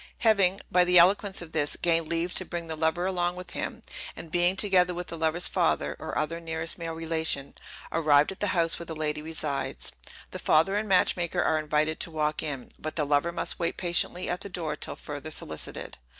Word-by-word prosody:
Having, 195 -3 +4
by 180 0 +5
the 180 0 +4
eloquence 190 +2 +4
of 165 - -12
this, 150 -2 0
gained 165 -2 +2
leave 170 +2 0
to - - -1
bring 175 -2 -5
the 160 -1 -4
lover 160 +3 +1
along 175 -2 0
with 180 0 -9
him, - - -4 0.3
and 165 - -9
being, 175 +2 +3
together 185 -3 +3
with 180 +1 -5
the - - -5
lover's 160 +2 0
father - - +1
or - - -4
other 165 +2 -1
nearest 160 0 -3
male 165 -1 -4
relation, 160 -4 +1 0.4
arrived 150 -2 +4
at 190 - -9
the 205 - +1
house 165 -1 +1
where 170 - -7
the 160 - -5
lady 150 -1 -1
resides, 155 -3 -3 0.4
the - - -6
father 165 +6 +3
and 210 0 -1
match 185 -1 +4
maker 175 -2 -1
are 155 - +2
invited 155 +1 0
to - - 0
walk 155 -1 -1
in, 140 -5 -5
but 155 - -5
the 150 - +1
lover 145 +4 +2
must - - -3
wait 170 - -1
patiently 175 0 0
at 180 - -2
the 200 - -7
door 165 -5 -3
till - - -4
further 145 +1 -7
solicited. 80 - -4
165 Hz, 210 wpm, -28 LUFS, 155-180 Hz, 0.4 s, by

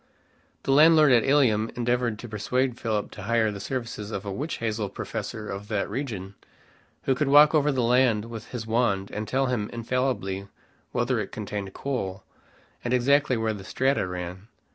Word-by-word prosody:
The - - 0
landlord 155 0 +7
at 120 -2 +5
Ilium 120 -6 +3
endeavored 120 -2 0
to 120 - -8
persuade 125 +4 -1
Philip 110 -2 -2
to 105 - -9
hire 110 +1 +1
the 100 - -7
services 115 -1 -4
of 100 -2 -5
a 100 - -3
witch 150 +10 -3
hazel 110 -3 -2
professor 105 +2 -5
of 100 +1 -6
that 105 -2 -1
region, 105 -7 -4 0.7
who 135 - +2
could 140 +2 0
walk 145 +2 +7
over 150 -1 +3
the 130 -3 0
land 120 -3 +3
with 115 -2 -8
his 120 -3 -6
wand 110 -4 0
and 105 0 -4
tell 135 +4 +1
him 120 -5 -1
infallibly 115 -5 -2 0.4
whether - - 0
it - - -4
contained 100 -2 -5
coal, 100 -8 -3 0.6
and 120 +1 +1
exactly 135 +1 +3
where 110 -1 0
the 100 -2 -8
strata 130 +1 0
ran. 90 +2 -6
115 Hz, 175 wpm, -26 LUFS, 105-130 Hz, 0.7 s, landlord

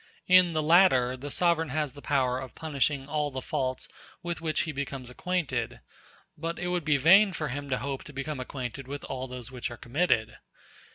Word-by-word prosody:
In 185 -2 +6
the 155 -1 0
latter 150 -7 +5
the 135 +3 -7
sovereign 165 0 +2
has 150 -1 -1
the 145 - -12
power 130 -3 +1
of 130 -3 -8
punishing 140 -3 -1
all 150 0 0
the 130 -2 -4
faults 130 -1 -2 0.4
with 175 -1 -3
which 160 -1 0
he 160 - -2
becomes 135 -3 -5
acquainted, 130 - -2 0.6
but 165 +2 -4
it 180 0 -3
would 180 -2 0
be 150 -2 +4
vain 190 +8 +6
for 155 -3 -3
him 140 +2 -5
to 130 - +1
hope 135 +2 -4
to - - -9
become 140 +1 -4
acquainted 130 0 -5
with 145 +1 -6
all 130 -1 -4
those 125 -1 -7
which 125 -2 -4
are 120 - -8
committed. 120 -4 0
140 Hz, 195 wpm, -28 LUFS, 130-160 Hz, 0.6 s, In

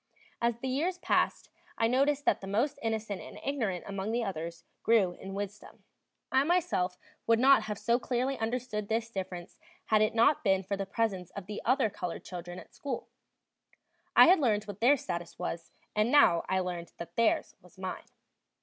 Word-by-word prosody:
As 235 -1 +1
the 260 - -5
years 320 +8 0
passed, - - 0 0.3
I 225 - +2
noticed 280 +4 +2
that - - +2
the 195 - -7
most 235 +9 0
innocent 220 -3 -2
and - - -10
ignorant 225 -11 -1
among 200 +1 -3
the 235 +1 0
others 170 -4 -5 0.2
grew 215 -6 +4
in 195 +2 -8
wisdom. 205 +1 -7 0.5
I 265 +1 +4
myself 310 - +1 0.3
would 230 0 +5
not 270 +3 +6
have 210 -2 -4
so 235 +3 +1
clearly 255 +2 -1
understood 225 -3 -3
this 225 0 -1
difference 185 -4 -6 0.3
had 215 -1 +3
it 215 +1 +2
not 255 +6 +4
been 190 -3 +3
for 200 +2 -2
the 195 0 -4
presence 195 -4 -1
of 200 - -6
the 210 +1 -6
other 255 -2 +3
colored 180 -3 -5
children 175 0 -7
at - - -12
school; 270 -4 -5 1.1
I - - +10
had 365 +1 +6
learned 215 -7 +2
what 205 -2 -8
their 270 +5 +6
status 170 -7 -5
was, 165 0 -4 0.3
and 215 +3 +2
now 175 - +5
I 190 0 +2
learned 175 -2 -5
that 170 0 -8
theirs 230 -1 +2
was 180 +1 -20
mine. 185 0 -5
215 Hz, 185 wpm, -30 LUFS, 190-250 Hz, 1.1 s, I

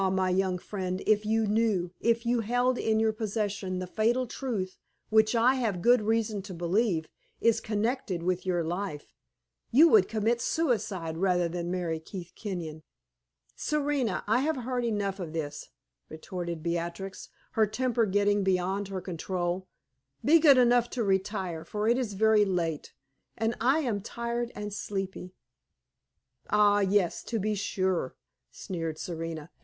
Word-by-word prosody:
my 185 -1 +1
young 185 0 +1
friend, 185 0 -4
if 210 0 +2
you 220 0 +2
knew, 210 -5 +1
if 235 0 +1
you 240 0 +2
held 245 +3 +1
in 220 0 +1
your 220 0 +2
possession 205 -3 -2
the 185 - -3
fatal 230 +7 +1
truth 220 -7 -4 0.3
which 220 +1 +4
I 235 +3 +5
have 225 -8 -1
good 240 +5 +5
reason 220 -1 0
to 190 -2 -8
believe 175 -1 0 0.3
is 230 -1 +3
connected 215 -4 -1
with 180 0 0
your 175 -2 0
life, 175 -2 -4 0.6
you 300 +8 +7
would 425 0 +6
commit 225 +2 +1
suicide 210 - -1
rather 180 -1 +2
than 170 0 -4
marry 175 -3 -2
Keith 175 +1 -9
Kenyon." 170 -7 -5 0.7
"Serena, 285 -8 0
I 220 +4 +3
have 310 +4 +1
heard 250 0 -1
enough 205 -4 -1
of 165 -4 -5
this," 155 -3 -5 0.4
retorted 170 0 -5
Beatrix, 170 +3 -4 0.2
her 220 -1 +3
temper 235 +1 0
getting 205 +1 +2
beyond 190 +1 0
her 190 -1 -4
control. 180 +1 -3 0.6
"Be 325 +4 +7
good 290 -4 +7
enough 245 -1 +4
to 235 - +1
retire; 190 -4 -1
for 210 +4 -2
it 240 +2 +3
is 230 -5 -2
very 215 +1 +4
late, 170 -6 -2 0.5
and 225 +1 0
I 270 +7 +3
am 225 -8 -1
tired 235 +2 -3
and 210 0 -5
sleepy." 195 -2 -5 1.1
"Ah, 205 -1 +4
yes, 195 -2 +2
to 230 - -2
be 215 +1 0
sure!" 185 -7 -1 0.3
sneered 165 -4 -5
Serena. 165 -2 -5
205 Hz, 150 wpm, -29 LUFS, 180-230 Hz, 1.1 s, you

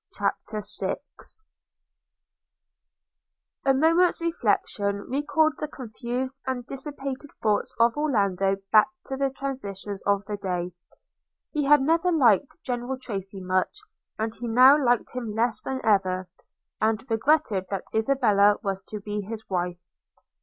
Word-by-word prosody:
CHAPTER 215 -2 -2 0.2
VI - - 0 2.7
A 270 - +5
MOMENT'S 330 +5 +4
reflection 205 -10 0
recalled 295 +3 +2
the 305 - -2
confused 255 +1 -5
and 250 -2 -2
dissipated 275 0 -5
thoughts 210 -2 +1
of 230 0 +4
Orlando 200 -10 +1 0.2
back 215 -1 +7 0.2
to 270 - -4
the 275 0 +1
transactions 205 -8 -4
of 200 0 +2
the 210 -1 -4
day. 180 -2 -3 0.8
He 295 -2 0
had 295 -1 +6
never 330 +5 +2
liked 275 - +3
General 245 +1 -3
Tracy 195 -6 -5
much; 185 - 0 0.4
and 220 0 -2
he 240 +1 -6
now 255 +4 +7
liked 245 -5 +1
him 235 -4 -4
less 230 +1 +1
than 265 0 -3
ever, 185 -3 +2 0.5
and 220 0 +2
regretted 225 -4 +2
that 195 -2 -3
Isabella 220 -4 +4
was 195 -1 -2
to 210 -1 -6
be 210 0 -3
his 220 +2 -7
wife. 180 -1 -2
230 Hz, 130 wpm, -26 LUFS, 200-275 Hz, 2.7 s, back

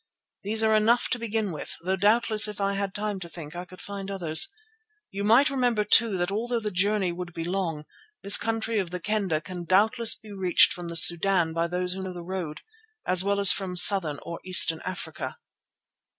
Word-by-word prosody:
These 220 +2 0
are 220 0 +2
enough 225 +3 +1
to 250 - -3
begin 220 -3 -3
with, 155 - -8
though 190 +2 -1
doubtless 215 +2 +2
if 210 -1 -8
I 200 0 -1
had 200 -1 -4
time 210 -1 -4
to 170 -2 -9
think 155 -1 -11
I 175 +1 -7
could 185 +1 -16
find 200 -1 -8
others. 170 -5 0 0.6
You 200 +1 -5
must 240 +8 +3
remember 245 -5 0
too 210 -1 +3
that 175 +2 -2
although 235 +3 -3
the 210 -2 -5
journey 195 0 0
would 175 0 -8
be 165 -1 -6
long, 170 -4 -4 0.4
this 200 - +7
country 225 -1 -2
of 185 -3 -4
the 180 +1 -6
Kendah 195 -5 -2
can 175 +2 -9
doubtless 220 +6 +2
be 215 - -15
reached 190 -3 +3
from 175 -1 -8
the 170 0 -4
Sudan 170 0 +4
by 165 +1 -2
those 180 +1 -3
who 190 - -7
know 190 -1 -7
the 175 -1 -9
road, 175 -4 -7 0.4
as 185 0 +3
well 200 0 -1
as 200 -2 +7
from 190 -2 -3
southern 175 -4 +6
or 170 - -8
eastern 170 -3 +3
Africa." 185 - -6
190 Hz, 205 wpm, -25 LUFS, 175-210 Hz, 0.6 s, this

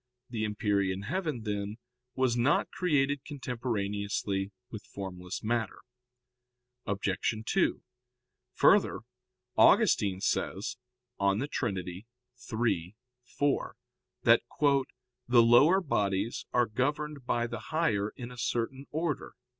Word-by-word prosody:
The 110 -3 -1
empyrean 100 -3 0
heaven, 155 - -2
then, 105 0 -3 0.4
was 130 -2 +2
not 120 +5 +2
created 145 -5 +1
contemporaneously 105 -7 -2 0.2
with 110 -2 -7
formless 90 -2 -7
matter. 115 -2 -1 1.1
Obj. 100 +2 0
2: - - +1 0.7
Further, - - +4 0.5
Augustine 95 -2 +5
says 100 +3 -1 0.4
(De 100 +7 +1
Trin. 120 -9 -2
iii, 90 +5 -8 1.2
4) 145 +2 -1 0.5
that - - +6 0.2
"the 140 -3 +2 0.5
lower 140 +11 +6
bodies 105 - -1
are 120 0 +3
governed 140 +4 -2
by 120 0 +1
the 115 -1 -5
higher 110 -7 0
in 125 -1 -7
a 125 - -10
certain 120 +4 -2
order." 160 -2 -3
115 Hz, 100 wpm, -30 LUFS, 100-135 Hz, 1.2 s, that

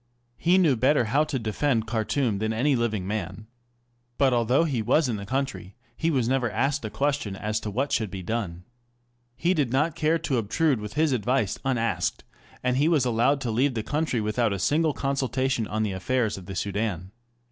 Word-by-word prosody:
He 175 +3 +4
knew 165 -8 +4
better 130 +2 +3
how 140 +8 +2
to 150 -3 -2
defend 115 +1 0
Khartoum 110 0 0
than 110 +1 -1
any 135 +5 +2
living 110 -5 -1
man. 100 0 -4 0.7
But 135 -2 +3
although 120 +5 +3
he 135 -8 -1
was 150 +7 +2
in 115 -4 -2
the 100 0 -7
country, 105 -9 -3 0.2
he 165 - 0
was 130 -7 +1
never 130 -1 +1
asked 135 +5 0
a 110 - -3
question 140 -6 -1
as 105 +2 -2
to 110 - -5
what 130 +8 -1
should 110 -3 0
be 95 -1 -6
done. 90 -5 -3 0.7
He 175 +7 +1
did 145 -9 0
not 150 +5 +1
care 160 0 +2
to 145 -5 -1
obtrude 130 +5 +1
with 105 0 -7
his 155 -1 +2
advice 125 -3 0
unasked, 120 -4 -1 0.4
and 125 0 +1
he 145 +3 +3
was 155 -6 +3
allowed 125 +4 +2
to 120 -3 -2
leave 130 +4 +1
the 110 - -2
country 150 -2 -1
without 105 +1 0
a - - -2
single 150 - +2
consultation 130 -4 -1
on 110 +1 -1
the 105 - -1
affairs 110 +4 0
of 95 -2 -10
the 95 - -6
Soudan. 100 -2 -2
120 Hz, 200 wpm, -26 LUFS, 105-140 Hz, 0.7 s, He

